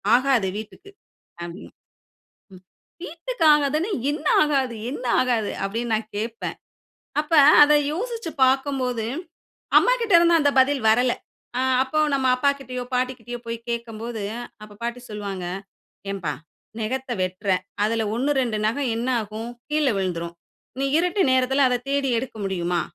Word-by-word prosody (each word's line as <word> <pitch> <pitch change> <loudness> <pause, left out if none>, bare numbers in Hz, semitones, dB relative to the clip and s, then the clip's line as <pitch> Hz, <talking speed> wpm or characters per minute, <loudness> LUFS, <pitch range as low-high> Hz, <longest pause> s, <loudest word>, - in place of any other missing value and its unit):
"ஆகாது 255 -6 +2
வீட்டுக்கு" 220 - -9 0.5
அப்படினு. 170 +2 -8 0.9
ம். 185 - -15 0.4
"வீட்டுக்கு 340 +6 -3
ஆகாதுன்னா 300 +7 +1 0.2
என்ன 300 +1 -5 0.2
ஆகாது 270 -5 0 0.2
என்ன 255 -2 -6 0.2
ஆகாது" 235 -5 0
அப்படினு 230 +4 -2
நான் 215 0 -5
கேட்பேன். 225 +2 -4 0.6
அப்ப 305 +2 -2 0.3
அத 295 - +6 0.2
யோசிச்சு 455 +1 -4
பாக்கும்போது 260 -3 0 0.7
அம்மாகிட்ட 480 -5 +2
இருந்து 340 0 +5
அந்த 285 - +3
பதில் 270 -1 +2
வரல. 245 +2 +3 0.5
ஆ - - +1 0.2
அப்போ 265 +4 -2 0.2
நம்ம 265 -1 +1
அப்பாகிட்டயோ, 270 -2 -1
பாட்டிகிட்டயோ 250 -1 -2
போய் 230 0 -3
கேக்கும்போது 230 -2 -4 0.4
அப்போ 210 -1 -12
பாட்டி 240 +1 -3
சொல்வாங்க 200 -3 -5 0.7
"ஏம்பா 175 -7 -3 0.5
நகத்த 255 +4 -3
வெட்டுற 185 +2 -4 0.3
அதில 225 +1 +1
ஒண்ணு 275 +5 0
2 235 -4 -1
நகம் 250 +3 0
என்ன 235 +2 -2
ஆகும்? 215 +2 -6 0.2
கீழ 305 0 +1
விழுந்துரும். 170 -3 -3 0.4
நீ 275 - +1
இருட்டு 360 +3 +1
நேரத்தில 260 +2 +3
அத 250 - +1
தேடி 280 -1 +1
எடுக்க 250 -1 -7
முடியுமா? 175 -2 -1
250 Hz, 130 wpm, -23 LUFS, 220-280 Hz, 0.9 s, அத